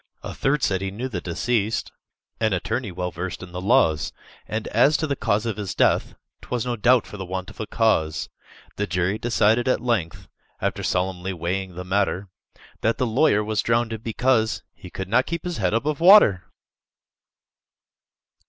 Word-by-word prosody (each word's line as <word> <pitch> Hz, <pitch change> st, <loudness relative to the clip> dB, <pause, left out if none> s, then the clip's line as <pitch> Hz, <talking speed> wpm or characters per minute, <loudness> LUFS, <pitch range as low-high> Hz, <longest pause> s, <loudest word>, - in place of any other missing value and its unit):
A -, -, -6 dB
third 135 Hz, +1 st, 0 dB
said, 95 Hz, -1 st, +1 dB
"He 95 Hz, -, -2 dB
knew 115 Hz, +7 st, -4 dB
the 95 Hz, -8 st, -4 dB
deceased, 110 Hz, +5 st, -1 dB, 0.5 s
An 110 Hz, -2 st, +1 dB
attorney 100 Hz, +4 st, -2 dB
well 90 Hz, 0 st, -3 dB
versed 90 Hz, +3 st, -5 dB
in 90 Hz, -, -10 dB
the 90 Hz, +1 st, -5 dB
laws, 95 Hz, -, +2 dB, 0.4 s
And 110 Hz, +1 st, -3 dB
as 135 Hz, +7 st, +4 dB
to 160 Hz, -, -1 dB
the 140 Hz, -2 st, -1 dB
cause 105 Hz, -3 st, 0 dB
of 110 Hz, -3 st, -2 dB
his 100 Hz, -4 st, -4 dB
death, -, -, +2 dB, 0.3 s
'Twas 125 Hz, -2 st, -3 dB
no 120 Hz, -1 st, -1 dB
doubt 120 Hz, +2 st, +3 dB
for 105 Hz, -, -10 dB
the 95 Hz, -, -5 dB
want 95 Hz, +1 st, -5 dB
of -, -, -17 dB
a 110 Hz, -, -4 dB
cause." 80 Hz, -10 st, +1 dB, 0.5 s
The 105 Hz, -, -1 dB
jury 90 Hz, +4 st, 0 dB
decided 115 Hz, +1 st, +2 dB
at 130 Hz, -, +2 dB
length, 95 Hz, -, -2 dB, 0.3 s
After -, -, -2 dB
solemnly 95 Hz, +1 st, -1 dB
weighing 90 Hz, +2 st, -3 dB
the 90 Hz, +1 st, -6 dB
matter, 95 Hz, 0 st, 0 dB, 0.5 s
That 115 Hz, -, +1 dB
the 130 Hz, -, +1 dB
lawyer 115 Hz, -2 st, +3 dB
was 105 Hz, -1 st, 0 dB
drownded, 115 Hz, -1 st, 0 dB
because 115 Hz, -1 st, +1 dB
He 90 Hz, -, -12 dB
could 95 Hz, +1 st, -6 dB
not 115 Hz, +6 st, +2 dB
keep 170 Hz, 0 st, -3 dB
his 175 Hz, -1 st, -4 dB
head 95 Hz, -4 st, +1 dB
above 145 Hz, +5 st, -1 dB
water! 170 Hz, -, +7 dB
105 Hz, 180 wpm, -23 LUFS, 95-120 Hz, 0.5 s, water